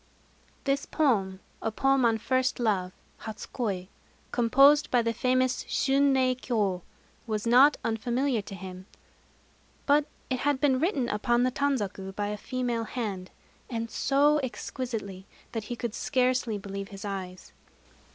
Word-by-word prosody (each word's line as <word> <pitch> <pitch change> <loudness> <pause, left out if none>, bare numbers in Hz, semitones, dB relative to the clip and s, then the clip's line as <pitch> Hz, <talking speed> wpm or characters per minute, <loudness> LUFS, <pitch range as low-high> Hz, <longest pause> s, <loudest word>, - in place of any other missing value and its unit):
This 275 0 0
poem 200 - +1 0.2
a 225 - -1
poem 270 +2 +2
on 225 -1 +3
first 260 +3 0
love 195 -6 0 0.3
(hatsu 220 -2 -7
koi), 195 -7 -2 0.4
composed 275 +5 +5
by 245 -2 +3
the 230 0 0
famous 255 +2 +1
Shunrei 270 -1 +3
Kyô 210 -8 -1 0.5
was 215 -1 -2
not 255 +5 +6
unfamiliar 240 +2 0
to 200 0 -9
him; 185 0 -9 1.0
but 295 +1 +3 0.2
it 255 - 0
had 285 -1 +1
been 265 -2 +3
written 290 - +1
upon 240 +2 +1
the 255 - +2
tanzaku 205 -9 -2
by 205 0 -2
a 210 - -2
female 240 0 -2
hand, 205 -7 -4 0.4
and 230 -2 -3
so 290 +2 +3
exquisitely 225 -7 -5 0.2
that 225 -3 -4
he 240 - -4
could 235 -2 -4
scarcely 250 -5 +1
believe 195 0 -6
his 195 0 -9
eyes. 185 -2 -6
240 Hz, 140 wpm, -28 LUFS, 205-260 Hz, 1.0 s, not